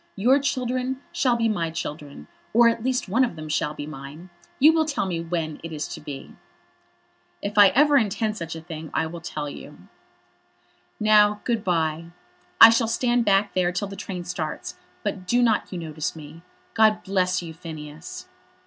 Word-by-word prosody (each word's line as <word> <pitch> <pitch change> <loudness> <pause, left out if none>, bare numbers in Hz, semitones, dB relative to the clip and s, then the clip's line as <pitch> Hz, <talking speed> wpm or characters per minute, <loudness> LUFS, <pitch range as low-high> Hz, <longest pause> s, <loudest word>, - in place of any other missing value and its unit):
Your 250 +8 +4
children 255 -1 -2
shall 250 -3 +2
be 230 -1 +1
my 175 -7 -1
children; 150 - -7 0.3
or 235 +1 +6
at 230 -1 0
least 255 -1 -1
one 230 +8 +2
of 240 - -1
them 155 -1 -8
shall 150 0 -1
be 145 - -6
mine. 155 +4 -10 0.3
You 310 +4 +6
will 320 -1 +2
tell 290 -8 -1
me 175 -3 -2
when 165 -2 -3
it 165 - -6
is 150 -1 -4
to - - -7
be." 140 -2 -8 1.1
"If 200 0 -4
I 205 -1 +8
ever 290 +1 +5
intend 215 -2 0
such 165 -5 -6
a 160 - -7
thing, 160 -1 -8
I - - +1
will 165 +1 -7
tell 150 -3 -5
you." 145 - -10 1.2
"Now, 210 -1 +4
good 230 -4 -1
bye. 165 -2 0 0.5
I 225 - +11
shall 230 0 +2
stand 240 +1 +1
back 200 0 +2
there 180 -1 +1
till 180 +3 -2
the 195 - -8
train 190 -3 -6
starts, 175 -4 -5 0.3
but 195 -3 -4
do 240 +5 +2
not 220 -3 +1
you 185 - -4
notice 160 -1 -4
me. 155 +1 -11 0.3
God 215 -1 +3
bless 185 -2 0
you, 165 -1 -7
Phineas." 155 -1 -9
185 Hz, 185 wpm, -24 LUFS, 160-230 Hz, 1.2 s, I